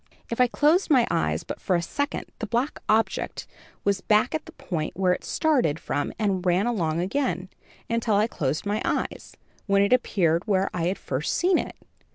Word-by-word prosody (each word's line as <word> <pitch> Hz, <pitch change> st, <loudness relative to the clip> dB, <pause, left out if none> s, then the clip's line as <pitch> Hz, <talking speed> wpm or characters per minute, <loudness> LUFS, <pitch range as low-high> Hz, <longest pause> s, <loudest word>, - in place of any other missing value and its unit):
If 230 Hz, -, +1 dB
I 250 Hz, -, +6 dB
closed 305 Hz, +10 st, +2 dB
my 255 Hz, -6 st, +5 dB
eyes 75 Hz, 0 st, 0 dB
but -, -, -7 dB
for 185 Hz, -, +1 dB
a 170 Hz, -, +1 dB
second, 285 Hz, -, -2 dB
the 220 Hz, -, -3 dB
black 240 Hz, +7 st, -1 dB
object 220 Hz, +1 st, 0 dB, 0.4 s
was 200 Hz, -1 st, +1 dB
back 215 Hz, +3 st, +2 dB
at 310 Hz, -, -3 dB
the -, -, -9 dB
point 175 Hz, -, -4 dB
where 185 Hz, -1 st, +3 dB
it -, -, -5 dB
started 255 Hz, -, +1 dB
from 145 Hz, -, -2 dB
and 200 Hz, -4 st, 0 dB
ran 180 Hz, +3 st, +2 dB
along 170 Hz, -9 st, 0 dB
again, 185 Hz, -2 st, -1 dB, 0.4 s
until 230 Hz, -2 st, +1 dB
I 210 Hz, +2 st, +4 dB
closed 150 Hz, -, -2 dB
my 205 Hz, +1 st, -1 dB
eyes, -, -, -3 dB, 0.3 s
when 200 Hz, 0 st, +4 dB
it 200 Hz, -, +3 dB
appeared 180 Hz, -7 st, +2 dB
where 195 Hz, -2 st, +1 dB
I 170 Hz, -1 st, -1 dB
had 185 Hz, -, -1 dB
first 140 Hz, +3 st, -2 dB
seen 360 Hz, +1 st, +3 dB
it. -, -, -5 dB
200 Hz, 195 wpm, -25 LUFS, 175-240 Hz, 0.4 s, I